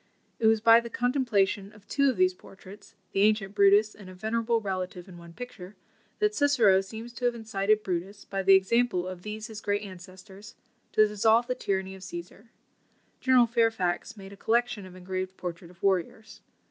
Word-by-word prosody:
It 225 - +3
was 220 -1 +3
by 230 +1 +7
the 235 0 -7
contemplation 225 -6 0
of 210 -1 -19
two 280 -1 +2
of 260 - -2
these 370 0 +3
portraits 195 - -15 0.2
(the 195 - 0
ancient 210 -1 +2
Brutus 205 +1 +4
and 200 -3 -13
a 185 - -11
venerable 225 +3 0
relative 185 -3 -5
in 175 -2 -12
one 170 0 -13
picture) 200 -2 -10 0.4
that 420 0 +1
Cicero 240 - +4
seems 225 +4 -9
to 245 - -5
have 240 -1 +1
incited 215 -1 0
Brutus, 190 +3 -4
by 195 -1 -3
the 195 0 +6
example 190 -1 +1
of 185 -1 -7
these 215 +2 -6
his 220 -2 -8
great 205 0 -1
ancestors, 190 +1 -12 0.4
to 215 0 +5
dissolve 220 +3 +3
the 250 - -1
tyranny 190 -5 -3
of 190 - -12
Cæsar. 185 +4 -9 0.7
General 255 -2 +5
Fairfax 225 -3 0
made 195 0 -11
a - - -13
collection 235 -2 0
of 185 - -14
engraved 185 +1 -5
portraits 170 -1 -7
of 180 - -20
warriors. 195 +3 -1
205 Hz, 185 wpm, -27 LUFS, 190-230 Hz, 0.7 s, by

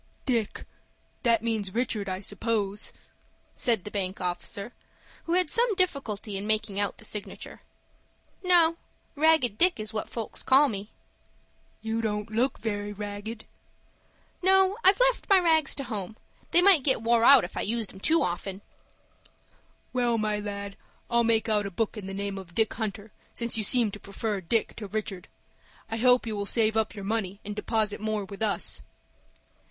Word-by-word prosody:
"Dick!—that 230 -1 -2
means 220 -4 -2
Richard, 220 -5 -1
I 185 0 -3
suppose," 205 0 -2 0.6
said 230 -6 +1
the 210 - -8
bank 190 -1 -3
officer, 195 +5 -4 0.5
who 335 - -1
had 360 -3 +2
some 470 -2 +2
difficulty 230 - -2
in 200 +2 -5
making 215 -2 0
out 205 -1 0
the - - -10
signature. 210 -1 -6 0.8
"No; 340 -2 +5 0.4
Ragged 300 -8 +3
Dick 360 -7 +4
is 215 +1 -5
what 215 - -3
folks 230 -2 -5
call 275 +2 +5
me." 205 -1 -5 0.9
"You 225 +1 -1
don't 210 -1 -3
look 245 +5 +1
very 205 -2 -3
ragged." 205 +2 -6 1.0
"No, 380 +1 +4
I've 385 +4 +6
left - - +2
my 395 - +7
rags 320 -5 +3
to 275 - -4
home. 220 -3 -5 0.3
They 350 - +5
might 385 -6 +7
get 260 -4 +1
wore 230 0 +3
out 275 +1 +8
if - - -7
I - - -1
used 225 -1 -2
'em 190 - -12
too 320 +11 +3
common." 190 +3 -3 1.3
"Well, 240 -2 +1
my 215 -1 0
lad, 200 -1 -6 0.3
I'll 235 0 +4
make 225 -1 +2
out 210 -2 +1
a - - -4
book 220 +4 -2
in 205 -3 -7
the 195 - -5
name 200 0 -3
of 175 -3 -13
Dick 220 -1 +2
Hunter, 210 -1 -5 0.2
since 235 0 -2
you 220 - -1
seem 230 0 +3
to 210 - -9
prefer 200 0 -4
Dick 220 +6 0
to 210 - -6
Richard. 195 -3 -5 0.6
I 225 - -1
hope 250 +1 +4
you 220 -2 -3
will 200 -1 -3
save 220 -1 +3
up 220 0 0
your 200 -2 -7
money 200 -2 -2
and 205 0 -5
deposit 215 -1 0
more 215 -2 -2
with 200 +2 -10
us." 215 -2 +1
220 Hz, 170 wpm, -27 LUFS, 205-245 Hz, 1.3 s, out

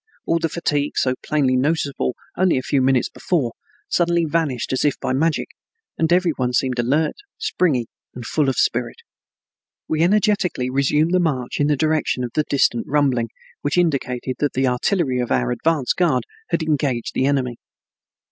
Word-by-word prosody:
All 165 - +1
the 165 0 -1
fatigue 145 -3 -1
so 130 - +2
plainly 140 -4 +1
noticeable 140 -1 0 0.2
only 185 -5 +2
a 130 - -2
few 140 - +1
minutes 130 -1 +2
before, 145 -10 -1 0.4
suddenly 170 -1 +2
vanished 145 -7 -1
as 130 - 0
if 145 - +1
by - - -1
magic, 155 +4 0 0.5
and 160 0 0
every 180 -1 +3
one 125 -4 -2
seemed 125 0 0
alert, 145 +7 +1 0.2
springy, 180 - +1 0.3
and 120 -1 -7
full 145 +2 +1
of 130 - -1
spirit. - - 0 0.9
We 155 0 0
energetically 190 - +2
resumed 150 +4 +2
the 185 - +4
march 135 -8 -1
in 145 - +3
the 150 -1 +2
direction 155 -4 0
of 120 - -4
the 155 - +1
distant 120 -4 +2
rumbling, 135 -5 +1 0.3
which 145 +3 -1
indicated 130 -7 0
that 145 - 0
the 130 +1 +1
artillery 130 +2 +1
of 125 - -2
our - - +1
advance 155 - +1
guard 160 -8 +1 0.3
had - - 0
engaged 140 -6 -1
the 130 - +1
enemy. 130 -4 0
145 Hz, 170 wpm, -21 LUFS, 130-165 Hz, 0.9 s, the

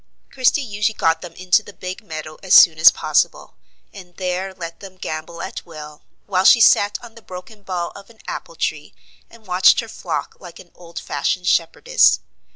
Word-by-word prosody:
Christie 265 +2 +1
usually 215 -1 -2
got 165 0 +1
them 175 -2 -10
into 185 +4 +2
the 205 - -14
big 185 0 -7
meadow 155 -4 -8
as 190 -1 +3
soon 160 -3 +7
as 160 +3 +9
possible, - - -1 0.4
and 180 -3 -14
there 185 +1 -3
let 170 -3 -9
them 190 -2 -12
gambol 165 0 -6
at - - -7
will; 150 -3 -12 0.2
while 185 -2 0
she 235 - +7
sat 205 -2 +4
on 235 -2 -12
the 230 - -15
broken 185 +2 -11
bough 180 -3 -4
of 200 +2 -13
an 230 - -19
apple - - -7
tree, - - -4 0.3
and 230 -2 -19
watched 185 0 +4
her 230 - -4
flock - - -5
like 175 -3 -12
an 175 - -16
old 170 -1 -15
fashioned 150 +5 -2
shepherdess. 195 - +2
185 Hz, 185 wpm, -20 LUFS, 170-205 Hz, 0.4 s, as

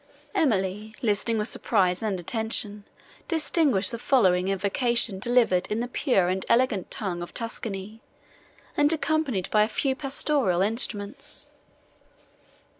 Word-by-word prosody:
Emily, 215 - 0
listening 225 +1 +1
with 210 0 0
surprise 185 -7 +1
and 205 -4 -2
attention, 210 +1 0 0.4
distinguished 305 - +2
the 235 - -4
following 190 -8 +2
invocation 200 +2 0
delivered 230 -5 +2
in 215 - -2
the 240 - -2
pure 245 - +1
and 185 +1 -1
elegant 235 -6 +2
tongue 185 -5 -3
of 175 - -8
Tuscany, 220 -2 -5 0.7
and 290 +1 +3
accompanied 310 - 0
by 210 - +4
a 210 - +3
few 265 +4 -1
pastoral 270 - +1
instruments. 220 +3 -2
220 Hz, 120 wpm, -26 LUFS, 195-255 Hz, 0.7 s, by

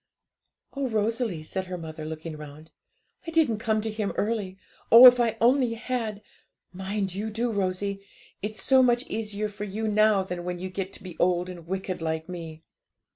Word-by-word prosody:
'Oh, 275 -1 -2
Rosalie,' 220 -5 -1
said 190 +4 -4
her 180 0 -4
mother, 160 -2 -7
looking 160 0 -6
round, 150 +1 -11 0.6
'I - - -2
didn't 310 -10 +2
come 220 -1 0
to 220 0 -3
Him 210 -2 -2
early 205 -3 -2 0.3
oh, 235 +3 +11
if 250 0 +10
I 230 -2 +1
only 245 0 +3
had! 225 -3 -3 0.5
Mind 190 0 -3
you 210 +3 -3
do, 230 +2 -1
Rosie; 195 0 -1 0.4
it's 215 +1 -5
so 265 0 +5
much 245 0 +3
easier 215 -1 -2
for 210 0 -7
you 210 +2 -3
now 215 -2 +4
than 180 -2 -5
when 180 0 -3
you 185 +2 -5
get 190 0 -4
to - - -10
be 180 -3 -10
old 180 0 +2
and 170 -2 -10
wicked 190 -1 -3
like 160 0 -2
me.' 165 -3 -8
200 Hz, 180 wpm, -26 LUFS, 180-225 Hz, 0.6 s, oh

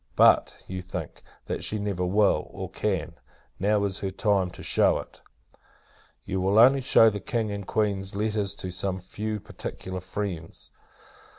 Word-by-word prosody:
But, - - +4
you 95 0 -5
think, 90 -3 -7 0.2
that - - -3
she 110 - +1
never 100 -3 -2
will, 100 +3 +2
or - - -7
can. - - -2 0.5
Now 105 +1 +2
is 100 -2 -1
her 100 - -2
time 95 -1 +1
to - - -11
shew - - +3
it. - - -10 1.0
You 95 0 -2
will 95 +3 +2
only 130 +4 +7
shew 115 -3 +6
the 105 - -4
King 110 +2 -2
and 100 -1 -5
Queen's 100 -3 -1
letters 105 -1 -1
to 90 - -5
some 95 +1 -1
few 105 +4 -4
particular 95 -1 -6
friends. 90 -3 -5
100 Hz, 160 wpm, -26 LUFS, 95-105 Hz, 1.0 s, only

